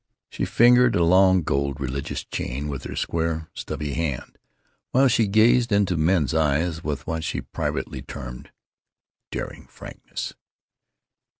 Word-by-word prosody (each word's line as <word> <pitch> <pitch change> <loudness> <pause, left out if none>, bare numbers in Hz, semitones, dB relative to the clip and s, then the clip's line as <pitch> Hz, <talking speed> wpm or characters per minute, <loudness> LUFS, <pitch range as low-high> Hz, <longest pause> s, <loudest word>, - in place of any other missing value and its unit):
She - - -2
fingered 125 +1 +5
a 85 - +3
long, 95 +1 +5
gold, 70 0 -1
religious 70 0 -3
chain 70 +5 -4
with 70 -2 -5
her - - -6
square, 80 -1 -2
stubby 75 -1 -4
hand, 75 -6 -3 0.5
while 135 +2 +4
she 115 -3 +3
gazed 115 +3 +4
into 100 -3 +2
men's 80 -3 +2
eyes 80 +2 +1
with 75 -2 -3
what 80 0 -3
she - - -2
privately - - -4
termed 60 -1 -8 0.8
"daring - - -6
frankness." - - -8
80 Hz, 130 wpm, -24 LUFS, 70-100 Hz, 0.8 s, fingered